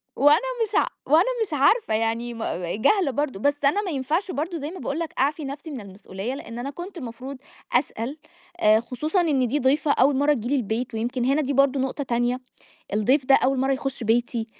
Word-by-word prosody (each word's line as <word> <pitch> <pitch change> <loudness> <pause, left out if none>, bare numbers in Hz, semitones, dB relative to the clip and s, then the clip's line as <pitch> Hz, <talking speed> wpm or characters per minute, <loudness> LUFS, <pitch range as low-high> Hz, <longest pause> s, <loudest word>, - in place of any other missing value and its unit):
وأنا 290 +3 +6 0.3
مش 430 -1 -4
ع - - +4 0.2
وأنا 315 +5 +6 0.2
مش 325 - -9
عارفة 295 - +3
يعني 225 +2 -1
مأ 180 -6 -3
جاهلة 350 - +2
برضه، 270 -6 -2
بس 285 +6 +2
أنا 350 +9 +3
ما 375 -4 -4
ينفعش 305 +8 -1
برضه 330 +3 -3
زي 295 +1 -5
ما 370 - -8
باقول 290 - -3
لَك 335 -2 -4
أعفي 290 +3 +1
نفْسي 285 +4 -7
من 265 -5 -6
المسؤولية، 195 +3 -6
لإن 240 -4 -8
أنا 270 - -4
كنت 350 +6 -8
المفروض 255 +1 -7 0.4
أسأل، 245 +1 -1 0.4
آآ 215 -4 +5
خصوصًا 280 - -1
إن 280 -7 +2
دي 290 +5 0
ضيفة 280 +3 +2
أول 275 +1 +4
مَرّة 290 +2 +3
تيجي 240 -4 -4
لي 280 - +1
البيت، 230 -1 -2
ويمكن 240 +2 -2
هنا 280 +4 +2
دي 280 0 -1
برضه 275 0 +3
نقطة 265 +2 -2
تانية، 240 0 0 0.5
الضيف 255 +7 +2
ده 270 - +6
أول 265 +1 +3
مَرّة 270 +1 +2
يخُش 270 -1 -3
بيتي، 230 0 0
270 Hz, 205 wpm, -24 LUFS, 240-295 Hz, 0.5 s, وأنا